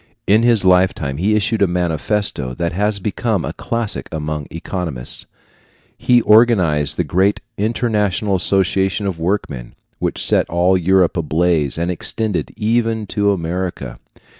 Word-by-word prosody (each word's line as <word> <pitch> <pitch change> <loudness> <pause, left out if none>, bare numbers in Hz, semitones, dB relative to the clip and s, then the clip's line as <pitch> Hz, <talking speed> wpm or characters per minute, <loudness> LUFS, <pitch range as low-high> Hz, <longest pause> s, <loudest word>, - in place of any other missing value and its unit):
In 105 +3 +4
his 115 -5 +3
lifetime 90 -7 +2
he 100 +6 +1
issued 110 +1 0
a 100 - +4
manifesto 85 -5 -1
that 85 -1 -2
has 105 +3 0
become 105 0 -2
a - - -4
classic 115 -3 -4
among 75 -2 -4
economists. 85 -7 -4 0.7
He 120 -1 +3
organized 95 -10 +3
the - - +1
great 95 +4 +1 0.2
International 105 -2 0
Association 95 +2 +1
of 95 -4 -3
Workmen, 80 -9 -3 0.2
which - - -2
set - - +2
all 90 +2 +2
Europe 95 0 +2
in - - +1
a 80 - -4
blaze 80 -4 +1
and 85 +2 -1
extended 105 +2 -2
even 115 0 0
to 100 0 +1
America. 85 -8 -4
95 Hz, 140 wpm, -18 LUFS, 85-105 Hz, 0.7 s, In